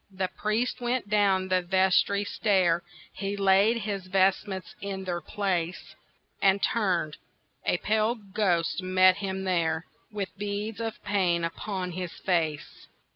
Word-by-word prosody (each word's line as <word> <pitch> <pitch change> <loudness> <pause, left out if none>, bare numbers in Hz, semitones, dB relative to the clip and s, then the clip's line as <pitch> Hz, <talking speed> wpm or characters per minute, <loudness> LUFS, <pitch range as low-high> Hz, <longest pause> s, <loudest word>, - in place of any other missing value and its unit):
The 190 -1 -3
priest 230 +4 -1
went 240 -3 -1
down 195 -3 +3
the 185 0 +3
vestry 190 +2 +2
stair, 185 -5 +2 0.3
He 200 0 -3
laid 200 +4 +4
his 200 -3 -4
vestments 190 0 +1
in 195 -1 -4
their 175 -2 -3
place, 180 -1 -2 0.5
And 195 0 +4
turned—a 170 - -2
pale 215 +4 +1
ghost 195 -5 0
met 185 0 +4
him 190 -1 -3
there, 165 -3 0 0.3
With 205 -3 -4
beads 205 +1 -3
of 225 0 -5
pain 185 -4 +1
upon 180 +2 -3
his 180 0 -5
face. 160 -5 -2
190 Hz, 130 wpm, -27 LUFS, 180-205 Hz, 0.5 s, laid